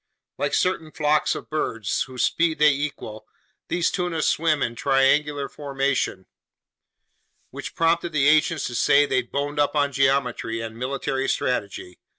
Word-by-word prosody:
Like -, -, 0 dB
certain 165 Hz, -4 st, 0 dB
flocks 150 Hz, 0 st, +1 dB
of -, -, -8 dB
birds, 115 Hz, -9 st, -1 dB
whose 130 Hz, -2 st, -4 dB
speed 165 Hz, -1 st, +1 dB
they 150 Hz, 0 st, +5 dB
equal, 140 Hz, -7 st, -5 dB, 0.4 s
these 175 Hz, -1 st, 0 dB
tuna 175 Hz, -3 st, -2 dB
swim 155 Hz, -2 st, +1 dB
in 115 Hz, -, -2 dB
triangle 140 Hz, +2 st, +2 dB
formation, 135 Hz, -9 st, -2 dB, 1.3 s
which -, -, -8 dB
prompted 165 Hz, +1 st, +1 dB
the 145 Hz, -3 st, +2 dB
ancients 155 Hz, +1 st, +3 dB
to 120 Hz, -, -5 dB
say 140 Hz, +4 st, +4 dB
they'd 130 Hz, -3 st, -1 dB
boned 145 Hz, +1 st, -2 dB
up 145 Hz, +1 st, +1 dB
on 145 Hz, -1 st, +2 dB
geometry 135 Hz, -4 st, 0 dB
and 115 Hz, 0 st, -6 dB
military 135 Hz, +2 st, -2 dB
strategy. 100 Hz, -6 st, -3 dB
140 Hz, 145 wpm, -23 LUFS, 130-155 Hz, 1.3 s, they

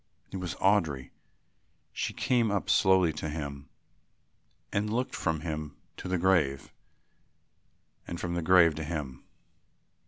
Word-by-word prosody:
It 95 Hz, -, -4 dB
was 90 Hz, -2 st, -4 dB
Audry. 80 Hz, -10 st, +1 dB, 0.8 s
She -, -, -2 dB
came 120 Hz, -4 st, +1 dB
slowly 95 Hz, -3 st, +4 dB
up -, -, -13 dB
to 80 Hz, -, -3 dB
him 70 Hz, -2 st, -6 dB, 1.0 s
and 105 Hz, +1 st, 0 dB
looked 125 Hz, +3 st, -1 dB
from 80 Hz, -3 st, -1 dB
him 75 Hz, -3 st, -5 dB, 0.2 s
to -, -, -7 dB
the 90 Hz, 0 st, 0 dB
grave 85 Hz, -7 st, +1 dB, 1.3 s
and 85 Hz, -, -5 dB
from 85 Hz, -1 st, -3 dB
the 85 Hz, -, -1 dB
grave 85 Hz, -1 st, +6 dB
to 80 Hz, +1 st, -5 dB
him. 75 Hz, -5 st, -5 dB
85 Hz, 130 wpm, -29 LUFS, 75-95 Hz, 1.3 s, grave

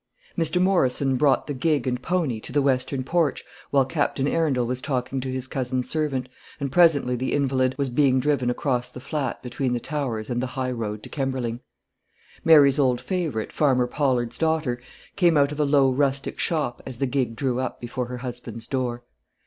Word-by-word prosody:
Mr. 165 Hz, +1 st, +1 dB
Morrison 140 Hz, -8 st, +2 dB
brought 135 Hz, +1 st, +3 dB
the 145 Hz, -, -3 dB
gig 145 Hz, -1 st, +1 dB
and 125 Hz, -1 st, -1 dB
pony 160 Hz, -8 st, 0 dB
to 110 Hz, -, -9 dB
the 145 Hz, +1 st, +2 dB
western 130 Hz, 0 st, 0 dB
porch 165 Hz, +1 st, 0 dB, 0.3 s
while 135 Hz, -2 st, +3 dB
Captain 140 Hz, -1 st, 0 dB
Arundel 145 Hz, -7 st, +1 dB
was 125 Hz, +1 st, -2 dB
talking 130 Hz, -1 st, -2 dB
to 130 Hz, 0 st, -4 dB
his 130 Hz, 0 st, -3 dB
cousin's 130 Hz, -1 st, -2 dB
servant, 145 Hz, -5 st, -1 dB, 0.3 s
and 140 Hz, -2 st, -3 dB
presently 150 Hz, -7 st, +4 dB
the 130 Hz, +2 st, -2 dB
invalid 130 Hz, -2 st, +1 dB
was 140 Hz, -1 st, 0 dB
being 130 Hz, 0 st, +3 dB
driven 130 Hz, -2 st, +1 dB
across 125 Hz, -1 st, -1 dB
the 125 Hz, -, -10 dB
flat 140 Hz, 0 st, -3 dB
between 125 Hz, +1 st, -2 dB
the 120 Hz, -, 0 dB
Towers 120 Hz, -6 st, -3 dB
and 120 Hz, 0 st, 0 dB
the 130 Hz, -, -1 dB
high 130 Hz, -1 st, -1 dB
road 110 Hz, -3 st, -4 dB
to -, -, -10 dB
Kemberling. 130 Hz, -4 st, -2 dB, 0.8 s
Mary's 145 Hz, -3 st, +6 dB
old 125 Hz, -3 st, +3 dB
favourite, 165 Hz, -, -2 dB
Farmer 130 Hz, -4 st, +2 dB
Pollard's 125 Hz, -3 st, 0 dB
daughter, 155 Hz, -7 st, 0 dB, 0.3 s
came 175 Hz, -5 st, +4 dB
out 140 Hz, 0 st, +3 dB
of 150 Hz, -, -6 dB
a 150 Hz, -, +3 dB
low 140 Hz, -2 st, +4 dB
rustic 135 Hz, 0 st, -1 dB
shop 150 Hz, -7 st, -1 dB
as 130 Hz, -3 st, -8 dB
the 135 Hz, -, 0 dB
gig 125 Hz, -3 st, -1 dB
drew 125 Hz, +1 st, -1 dB
up 130 Hz, -, -3 dB
before 120 Hz, +1 st, -4 dB
her 125 Hz, 0 st, -5 dB
husband's 120 Hz, -2 st, -7 dB
door. 120 Hz, -2 st, -2 dB
130 Hz, 190 wpm, -24 LUFS, 125-145 Hz, 0.8 s, Mary's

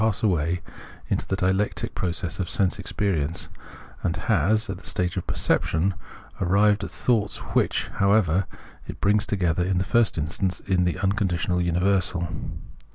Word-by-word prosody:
pass 110 Hz, -1 st, +1 dB
away 85 Hz, -3 st, +1 dB, 0.5 s
in -, -, +1 dB
the 95 Hz, -, 0 dB
dialectic 95 Hz, +2 st, 0 dB
process 85 Hz, -2 st, -3 dB
of 95 Hz, -, -2 dB
sense 95 Hz, -1 st, +1 dB
experience, 90 Hz, -6 st, -1 dB, 0.5 s
and 85 Hz, -, 0 dB
has, 110 Hz, +3 st, +2 dB
at 95 Hz, -2 st, -5 dB
the -, -, -18 dB
stage 90 Hz, -1 st, -1 dB
of 95 Hz, -, -3 dB
perception, 90 Hz, +5 st, +1 dB, 0.5 s
arrived 100 Hz, +3 st, +3 dB
at -, -, -4 dB
thoughts 110 Hz, -5 st, 0 dB, 0.2 s
which, -, -, +2 dB
however, 100 Hz, -3 st, +3 dB, 0.4 s
it -, -, -7 dB
brings 105 Hz, +1 st, +2 dB
together 90 Hz, -4 st, +1 dB
in 95 Hz, 0 st, 0 dB
the 90 Hz, -, +2 dB
first 115 Hz, 0 st, +2 dB
instance 85 Hz, +4 st, -1 dB
in 90 Hz, -2 st, +1 dB
the 90 Hz, 0 st, 0 dB
unconditioned 90 Hz, -3 st, +1 dB
universal. 90 Hz, 0 st, +1 dB
95 Hz, 150 wpm, -25 LUFS, 90-100 Hz, 0.5 s, arrived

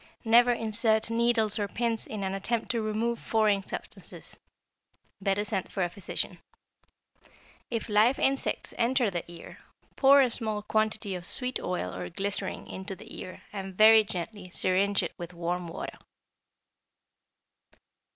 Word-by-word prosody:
Never 240 Hz, +2 st, +6 dB
insert 225 Hz, -1 st, +1 dB
needles 230 Hz, -2 st, +2 dB
or 205 Hz, -, 0 dB
pins 230 Hz, +1 st, -2 dB
in 210 Hz, -2 st, -4 dB
an 190 Hz, 0 st, -1 dB
attempt 220 Hz, +4 st, -1 dB
to 235 Hz, -2 st, -1 dB
remove 220 Hz, +2 st, -1 dB
foreign 215 Hz, -3 st, +2 dB
substances. -, -, -6 dB, 0.9 s
Better 200 Hz, +1 st, +1 dB
send 200 Hz, -3 st, -3 dB
for 190 Hz, -, -1 dB
a 175 Hz, -, 0 dB
physician. 190 Hz, 0 st, -4 dB, 1.3 s
If 230 Hz, -3 st, -2 dB
live 220 Hz, +5 st, +4 dB
insects 270 Hz, 0 st, 0 dB
enter 240 Hz, -2 st, +2 dB
the 175 Hz, -2 st, -3 dB
ear, 170 Hz, -1 st, -11 dB, 0.4 s
pour 275 Hz, +1 st, +7 dB
a 255 Hz, -3 st, +3 dB
small 215 Hz, -3 st, -2 dB
quantity 215 Hz, -2 st, 0 dB
of 180 Hz, -1 st, -5 dB
sweet 255 Hz, 0 st, -2 dB
oil 180 Hz, -, -3 dB
or 90 Hz, -1 st, -5 dB
glycerin 200 Hz, -, -3 dB
into 190 Hz, +1 st, -6 dB
the -, -, -11 dB
ear 185 Hz, -, -8 dB
and 195 Hz, -2 st, -6 dB
very 220 Hz, 0 st, +8 dB
gently 185 Hz, 0 st, -6 dB
syringe 190 Hz, +2 st, +2 dB
it 170 Hz, -, -4 dB
with 175 Hz, 0 st, -7 dB
warm 175 Hz, +1 st, -2 dB
water. 165 Hz, -, -6 dB
210 Hz, 140 wpm, -29 LUFS, 190-230 Hz, 1.3 s, very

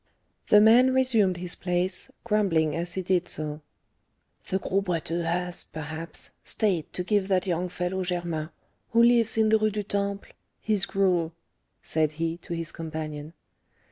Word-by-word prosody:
The 210 Hz, -, +7 dB
man 245 Hz, +5 st, +6 dB
resumed 225 Hz, -8 st, +3 dB
his 175 Hz, 0 st, -3 dB
place, 180 Hz, +1 st, -1 dB
grumbling 185 Hz, -9 st, +1 dB
as 170 Hz, +1 st, -2 dB
he 190 Hz, -, -2 dB
did 180 Hz, -1 st, +1 dB
so. 150 Hz, 0 st, -3 dB, 0.9 s
"The 190 Hz, -, +1 dB
Gros 195 Hz, +1 st, -1 dB
Boiteux 170 Hz, -2 st, -1 dB
has, 175 Hz, +1 st, -1 dB
perhaps, 160 Hz, +1 st, -7 dB
stayed 190 Hz, -8 st, 0 dB
to 180 Hz, -, -2 dB
give 200 Hz, 0 st, +1 dB
that 190 Hz, -1 st, +1 dB
young 180 Hz, 0 st, -1 dB
fellow 180 Hz, +1 st, -2 dB
Germain, 175 Hz, -3 st, -2 dB, 0.4 s
who 230 Hz, 0 st, +6 dB
lives 235 Hz, -2 st, +4 dB
in 220 Hz, -1 st, +4 dB
the 220 Hz, 0 st, +4 dB
Rue 215 Hz, 0 st, +2 dB
du 210 Hz, 0 st, -3 dB
Temple, 200 Hz, 0 st, -3 dB, 0.3 s
his 205 Hz, -5 st, +1 dB
gruel," 180 Hz, -4 st, +1 dB, 0.5 s
said 155 Hz, -1 st, 0 dB
he, 165 Hz, +1 st, -2 dB
to 170 Hz, 0 st, -6 dB
his 165 Hz, -1 st, -3 dB
companion. 155 Hz, -1 st, -6 dB
180 Hz, 155 wpm, -26 LUFS, 165-205 Hz, 0.9 s, The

